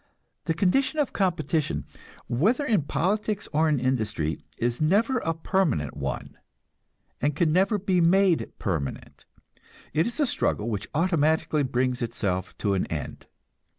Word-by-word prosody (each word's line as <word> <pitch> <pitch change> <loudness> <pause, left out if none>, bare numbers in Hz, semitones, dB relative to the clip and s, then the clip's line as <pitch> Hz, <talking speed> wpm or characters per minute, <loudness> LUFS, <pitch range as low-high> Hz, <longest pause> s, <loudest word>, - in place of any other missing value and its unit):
The 165 - 0
condition 240 - +2
of 295 -3 0
competition, 175 -5 0 0.4
whether 215 - +1
in 215 - +2
politics 200 +9 -1
or 155 +2 +3
in 150 -3 +2
industry, 110 -11 -1
is 120 +2 -1
never 220 +11 +3
a 165 -5 -2
permanent 160 - 0
one, - - -5 0.8
and 145 +1 +1
can 155 -1 +2
never 195 +4 +3
be 185 -2 +1
made 180 0 +3
permanent; 80 -9 -4 0.7
it 160 +6 +2
is 240 - -5
a 295 - +4
struggle 115 - -1
which 105 -2 -4
automatically 160 -2 +2
brings 125 -1 0
itself 100 -6 -2
to 100 -2 0
an 95 - 0
end. 75 -4 -6
160 Hz, 140 wpm, -26 LUFS, 120-195 Hz, 0.8 s, a